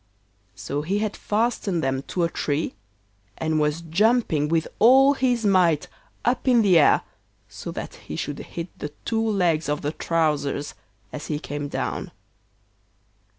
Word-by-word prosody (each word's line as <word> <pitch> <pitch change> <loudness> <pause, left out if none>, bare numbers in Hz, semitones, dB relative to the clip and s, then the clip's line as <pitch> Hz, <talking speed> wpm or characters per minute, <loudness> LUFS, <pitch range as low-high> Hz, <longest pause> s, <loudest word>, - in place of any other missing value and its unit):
So 140 +9 -3
he 185 +7 -1
had 210 0 -1
fastened 210 -5 -1
them 135 0 0
to 180 - -1
a 170 - +2
tree 145 +1 -1 0.6
and 160 -1 0
was 150 +2 0
jumping 170 -2 +2
with 165 +1 +1
all 265 +5 +7
his 245 -4 0
might 180 -6 +3 0.4
up 245 +2 0
in 240 -3 +5
the 185 -5 +6
air 150 - +5 0.5
so - - -8
that - - -6
he 75 - -9
should 145 - -4
hit 170 +1 -6
the 150 - -4 0.2
two 225 -1 0
legs 180 -8 +1
of 150 0 -1
the 145 - -1
trousers 150 -4 -1 0.4
as 150 0 -6
he 150 - -1
came 145 -1 -5
down. - - -3
165 Hz, 150 wpm, -24 LUFS, 150-215 Hz, 0.6 s, all